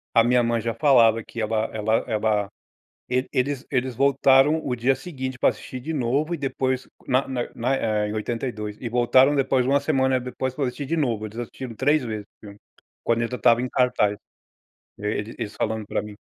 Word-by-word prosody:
A 115 Hz, -, +7 dB
minha 125 Hz, +1 st, +3 dB
mãe 115 Hz, 0 st, +1 dB
já 115 Hz, +1 st, -2 dB
falava 115 Hz, -3 st, +4 dB
que 115 Hz, -, -9 dB
ela 110 Hz, 0 st, 0 dB
ela 110 Hz, +1 st, 0 dB
ela, 105 Hz, -3 st, 0 dB, 0.6 s
ele 130 Hz, +1 st, -1 dB
eles 135 Hz, +1 st, -1 dB
eles 130 Hz, -2 st, -1 dB
voltaram 140 Hz, +3 st, +4 dB
o 125 Hz, -, -1 dB
dia 125 Hz, +3 st, +2 dB
seguinte 130 Hz, -3 st, -6 dB
para -, -, +5 dB
assistir 130 Hz, -, -7 dB
de 155 Hz, +6 st, -5 dB
novo 140 Hz, +4 st, 0 dB
e -, -, -2 dB
depois 130 Hz, -2 st, -1 dB, 0.2 s
na 130 Hz, +1 st, +2 dB
na 130 Hz, -2 st, -2 dB
na 125 Hz, +4 st, 0 dB
eh, 105 Hz, -3 st, 0 dB
em -, -, -4 dB
82 110 Hz, -1 st, -4 dB
e 120 Hz, -, -4 dB
voltaram 130 Hz, +4 st, +4 dB
depois 130 Hz, -2 st, +2 dB
uma 140 Hz, +2 st, +3 dB
semana 130 Hz, -3 st, +1 dB
depois 125 Hz, +1 st, -4 dB
para 140 Hz, 0 st, -1 dB
assistir 135 Hz, +3 st, -4 dB
de 165 Hz, +5 st, -1 dB
novo, 115 Hz, -8 st, 0 dB
eles 110 Hz, +1 st, -9 dB
assistiram 120 Hz, +1 st, -6 dB
3 145 Hz, +5 st, +2 dB
vezes 110 Hz, -3 st, -5 dB
o -, -, -68 dB
filme, 100 Hz, 0 st, -11 dB, 0.5 s
quando 115 Hz, 0 st, +1 dB
ele 115 Hz, -, -2 dB
já 125 Hz, -, -3 dB
estava 115 Hz, +1 st, +4 dB
em 130 Hz, -, -3 dB
cartaz, 105 Hz, -5 st, +1 dB, 0.8 s
eles 105 Hz, 0 st, -4 dB
falando 110 Hz, -1 st, -2 dB
para -, -, -1 dB
mim. 105 Hz, -1 st, -9 dB
125 Hz, 200 wpm, -24 LUFS, 110-135 Hz, 0.8 s, A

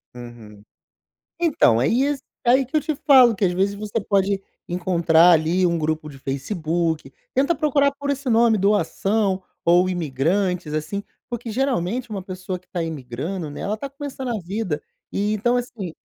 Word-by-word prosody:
Uhum. 115 Hz, -4 st, -11 dB, 0.8 s
Então, 270 Hz, -, +3 dB
isso 270 Hz, -, +1 dB, 0.2 s
aí 260 Hz, +3 st, +5 dB
que 285 Hz, +5 st, -3 dB
eu -, -, +4 dB
te 310 Hz, +1 st, -2 dB
falo, 260 Hz, -4 st, +6 dB
que 200 Hz, -1 st, -1 dB
às 180 Hz, -, +2 dB
vezes, 195 Hz, +3 st, +1 dB
você 210 Hz, +2 st, -3 dB
pode 195 Hz, -1 st, +1 dB, 0.3 s
encontrar 175 Hz, -1 st, +4 dB
ali 170 Hz, +3 st, +3 dB
um 170 Hz, -1 st, +1 dB
grupo 155 Hz, 0 st, -2 dB
de 140 Hz, -, -11 dB
Facebook. 160 Hz, +4 st, -2 dB, 0.2 s
Tenta 280 Hz, +6 st, +2 dB
procurar 285 Hz, -2 st, +2 dB
por 285 Hz, 0 st, -4 dB
esse 275 Hz, -1 st, -2 dB
nome, 230 Hz, -2 st, +4 dB
doação 200 Hz, 0 st, +1 dB, 0.2 s
ou 175 Hz, +2 st, +4 dB
imigrantes 175 Hz, +2 st, -1 dB
assim. 155 Hz, +7 st, -3 dB, 0.3 s
Porque 240 Hz, -1 st, -5 dB
geralmente 245 Hz, -2 st, -1 dB
uma 200 Hz, -3 st, -4 dB
pessoa 185 Hz, 0 st, -5 dB
que 185 Hz, -, -30 dB
está 180 Hz, -2 st, -3 dB
imigrando, 155 Hz, +3 st, -5 dB
né, 145 Hz, -, -8 dB
ela 205 Hz, -, -1 dB
está 275 Hz, +5 st, -6 dB
começando 275 Hz, -2 st, -6 dB
a 235 Hz, -2 st, -1 dB
vida, 180 Hz, -3 st, -3 dB, 0.3 s
e 205 Hz, +1 st, 0 dB
então 240 Hz, +4 st, +1 dB
assim 230 Hz, -8 st, -4 dB
195 Hz, 165 wpm, -22 LUFS, 165-240 Hz, 0.8 s, falo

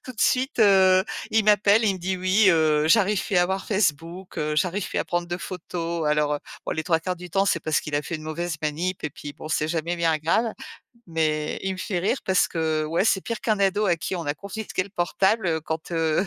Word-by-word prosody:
tout 255 Hz, -, -7 dB
de 220 Hz, -, -9 dB
suite, 260 Hz, +2 st, +1 dB
heu, 190 Hz, -2 st, +5 dB, 0.3 s
il 220 Hz, -1 st, +2 dB
m'appelle, 210 Hz, +1 st, +4 dB
il 200 Hz, -3 st, +2 dB
me -, -, -7 dB
dit: 185 Hz, +2 st, -2 dB
«Oui, 185 Hz, +4 st, +3 dB
heu, 155 Hz, -2 st, +3 dB
j'arrive 205 Hz, +1 st, +3 dB
pu 195 Hz, -, -2 dB
à 175 Hz, -, +5 dB
avoir 190 Hz, +2 st, -2 dB
Facebook, 180 Hz, -2 st, -1 dB
heu, 150 Hz, 0 st, -1 dB
j'arrive 180 Hz, +4 st, 0 dB
pu -, -, -6 dB
à -, -, 0 dB
prendre 175 Hz, 0 st, -2 dB
de 175 Hz, 0 st, -3 dB
photos» 170 Hz, -3 st, -4 dB
alors, 150 Hz, 0 st, +2 dB
heu, -, -, -2 dB, 0.3 s
bon -, -, -2 dB
les 160 Hz, -, -3 dB
3/4 170 Hz, +2 st, 0 dB
du 180 Hz, 0 st, -10 dB
temps, 195 Hz, +4 st, +2 dB
c'est 170 Hz, -, +1 dB
parce 155 Hz, 0 st, 0 dB
qu'il 150 Hz, -, -6 dB
a -, -, +1 dB
fait 170 Hz, -, -5 dB
une 155 Hz, -, -11 dB
mauvaise 160 Hz, +2 st, -3 dB
manip 170 Hz, +5 st, -2 dB
et 150 Hz, -, -2 dB
puis 145 Hz, +1 st, -9 dB
bon, -, -, -9 dB
c'est 155 Hz, -1 st, 0 dB
jamais 170 Hz, +1 st, -2 dB
bien 165 Hz, -2 st, +2 dB
grave 215 Hz, +9 st, +1 dB, 0.5 s
mais 155 Hz, -2 st, -1 dB
il 195 Hz, -, -1 dB
me 185 Hz, -, -11 dB
fait 180 Hz, -1 st, -2 dB
rire 200 Hz, +9 st, 0 dB
parce 190 Hz, -1 st, +2 dB
que 160 Hz, -2 st, -1 dB
ouais, 165 Hz, +5 st, 0 dB
c'est 195 Hz, -3 st, +3 dB
pire 230 Hz, -2 st, -4 dB
qu'un 215 Hz, -2 st, 0 dB
ado 200 Hz, +2 st, +2 dB
à 175 Hz, -, +3 dB
qui 185 Hz, -, -4 dB
on 170 Hz, -3 st, -5 dB
a 145 Hz, -, 0 dB
confisqué 200 Hz, +2 st, -4 dB
le 190 Hz, -, -11 dB
portable 185 Hz, -1 st, +1 dB
quand, 160 Hz, +2 st, -5 dB
heu, 165 Hz, +3 st, +1 dB
175 Hz, 245 wpm, -24 LUFS, 160-195 Hz, 0.5 s, heu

